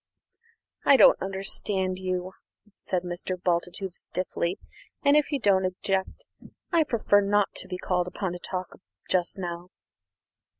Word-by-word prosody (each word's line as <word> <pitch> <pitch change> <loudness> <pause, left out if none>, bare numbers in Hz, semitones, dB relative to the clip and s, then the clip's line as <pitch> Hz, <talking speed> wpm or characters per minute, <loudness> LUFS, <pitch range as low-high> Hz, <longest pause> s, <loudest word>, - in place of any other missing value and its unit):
"I 275 - +7
don't - - +7
understand 190 -1 -1
you," 185 0 -2 0.5
said 180 -2 -1
Mr. 180 +1 -4
Bultitude 175 +1 -1
stiffly; 180 0 -3 0.5
"and, 285 +1 +6
if 300 0 +3
you 285 - 0
don't 195 -4 +3
object, 190 - -2 0.5
I 335 -3 +4
prefer 220 -7 +3
not 205 0 +2
to - - -2
be 180 - -4
called 180 -1 0
upon 190 0 -3
to 175 - -6
talk 185 0 -6 0.3
just 180 0 +1
now." 175 -1 -5
185 Hz, 135 wpm, -27 LUFS, 180-200 Hz, 0.5 s, I